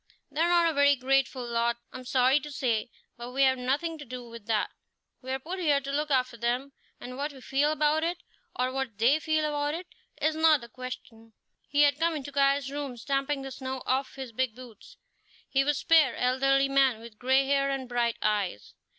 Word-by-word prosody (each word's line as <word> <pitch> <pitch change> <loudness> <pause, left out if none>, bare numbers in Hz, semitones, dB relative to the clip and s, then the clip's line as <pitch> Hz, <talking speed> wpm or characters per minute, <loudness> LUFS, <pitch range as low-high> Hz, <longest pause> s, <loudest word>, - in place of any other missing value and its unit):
They 295 +3 -2
are 340 - +3
not 345 -1 +4
a 325 - +1
very 285 0 +5
grateful 265 -1 +1
lot, 235 0 0 0.2
I'm 255 - -8
sorry 260 +2 +3
to 295 +1 -9
say, 245 -4 -1 0.3
but 240 +1 -7
we 275 +1 +3
have 260 -1 +3
nothing 290 +6 -1
to - - -7
do 250 -2 -8
with 230 -2 -11
that; 220 -2 0 0.5
we're 260 +1 -3
put 345 +8 -6
here 295 -5 +3
to 275 0 -6
look 300 +2 -1
after 255 -3 +1
them, 245 +4 -1 0.3
and 250 +1 -8
what 290 +2 -2
we 275 - -13
feel 280 +3 +1
about 310 +1 +2
it, 340 +1 -1 0.4
or 255 +1 0
what 260 -5 -4
they 250 +8 +4
feel 310 0 0
about 295 0 -1
it, 355 +2 -6 0.3
is 310 +1 +1
not 315 -3 +4
the 235 - -11
question." 225 -2 -9 0.4
He 290 +1 +4
had 285 0 +3
come 330 0 +1
into 285 -1 -6
Caius' 275 0 +2
room, 280 -3 -5
stamping 275 +3 -1
the 270 - -6
snow 260 0 -5
off 265 +1 -1
his 265 -3 -7
big 245 -1 -1
boots. 245 -4 -13 0.5
He 270 0 +2
was 290 0 +1
a - - -4
spare, 315 -7 +4
elderly 270 +2 +2
man, 270 -4 +3
with 230 -2 -13
gray 265 +2 +3
hair 275 0 +2
and 270 -2 -3
bright 240 -1 0
eyes. 205 - -1
270 Hz, 210 wpm, -28 LUFS, 250-290 Hz, 0.5 s, very